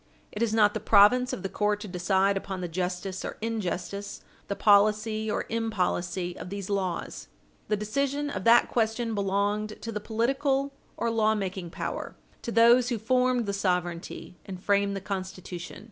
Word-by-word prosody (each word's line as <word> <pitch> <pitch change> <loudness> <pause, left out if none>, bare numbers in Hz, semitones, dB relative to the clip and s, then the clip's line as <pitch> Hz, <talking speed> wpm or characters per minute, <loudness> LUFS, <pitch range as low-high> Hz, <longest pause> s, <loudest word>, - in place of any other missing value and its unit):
It 210 - -6
is 230 -2 +2
not 210 -2 +4
the 220 - -2
province 220 +5 +5
of - - -5
the - - -1
court 210 +1 0
to 210 - -6
decide 190 +2 +1
upon 190 -1 -4
the 175 - -2
justice 180 +2 -3
or - - -5
injustice, 200 -2 -4 0.3
the 200 - -2
policy 215 +2 +3
or - - -1
impolicy, 185 -5 -1
of - - -7
these 200 0 -5
laws. 185 -3 -3 0.4
The 210 - +1
decision 280 +7 -1
of - - -4
that 235 +1 +6
question 225 0 0
belonged 205 +1 -1
to 230 - -4
the 210 - -3
political 270 +6 0 0.2
or 230 - 0
lawmaking 205 -5 0
power, - - -5 0.3
to 235 - -4
those 235 +2 +5
who 240 - 0
formed 250 +2 +1
the 200 - -2
sovereignty 180 -2 -2
and 190 -2 -8
framed 200 +1 +1
the 195 - -4
Constitution. 185 -2 -6
205 Hz, 165 wpm, -27 LUFS, 190-225 Hz, 0.4 s, that